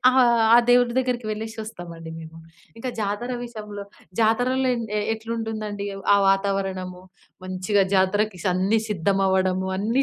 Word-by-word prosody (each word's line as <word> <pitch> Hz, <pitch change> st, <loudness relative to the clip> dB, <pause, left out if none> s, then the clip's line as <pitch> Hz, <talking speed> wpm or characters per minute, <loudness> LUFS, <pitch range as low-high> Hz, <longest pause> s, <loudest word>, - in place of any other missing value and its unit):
ఆహ్, 260 Hz, +1 st, +4 dB, 0.4 s
ఆ -, -, +9 dB
దేవుడి 245 Hz, -1 st, +5 dB
దగ్గరికి 250 Hz, -2 st, -1 dB
వెళ్లేసొస్తామండి 215 Hz, -7 st, -7 dB
మేము. 165 Hz, 0 st, -11 dB, 0.4 s
ఇంకా 255 Hz, +2 st, -3 dB
జాతర 210 Hz, +4 st, -2 dB
విషయంలో 210 Hz, -4 st, -8 dB, 0.4 s
జాతరలో 250 Hz, +4 st, +2 dB
ఎన్ 230 Hz, -, -3 dB, 0.3 s
ఎట్లుంటుందండి, 220 Hz, -2 st, -4 dB, 0.3 s
ఆ -, -, +6 dB
వాతావరణము 195 Hz, -2 st, -1 dB, 0.4 s
మంచిగా 185 Hz, +2 st, +1 dB
జాతరకి 195 Hz, +1 st, +2 dB, 0.2 s
అన్ని 195 Hz, +5 st, +2 dB
సిద్ధమవ్వడము 190 Hz, -1 st, +1 dB
అన్నీ 230 Hz, +7 st, +1 dB
205 Hz, 115 wpm, -24 LUFS, 190-225 Hz, 0.4 s, ఆ